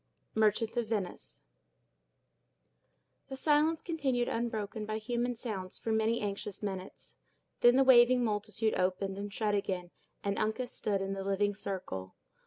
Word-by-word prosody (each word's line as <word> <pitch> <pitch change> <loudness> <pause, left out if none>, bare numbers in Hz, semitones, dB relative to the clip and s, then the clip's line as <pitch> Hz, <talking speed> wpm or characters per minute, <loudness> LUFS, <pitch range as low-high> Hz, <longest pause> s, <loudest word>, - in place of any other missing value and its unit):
—Merchant 220 +1 +2
of 235 -2 0
Venice 205 -5 -4 1.8
The 265 - -6
silence 305 +3 +2
continued 270 -8 0
unbroken 220 -2 -2
by 215 0 -2
human 240 +2 -1
sounds 205 -6 -4
for 225 - -3
many 220 +1 +2
anxious 205 0 -4
minutes. 190 -2 -6 0.4
Then 240 +1 +6
the 270 - +6
waving 250 -1 +7
multitude 215 0 0
opened 190 +1 -1
and 205 0 -5
shut 210 0 0
again, 190 -3 -2 0.3
and 200 0 -1
Uncas 220 +4 -1
stood 200 -5 -1
in 195 0 -2
the 195 0 -4
living 200 +1 +1
circle. 185 - -5
215 Hz, 140 wpm, -32 LUFS, 195-240 Hz, 1.8 s, waving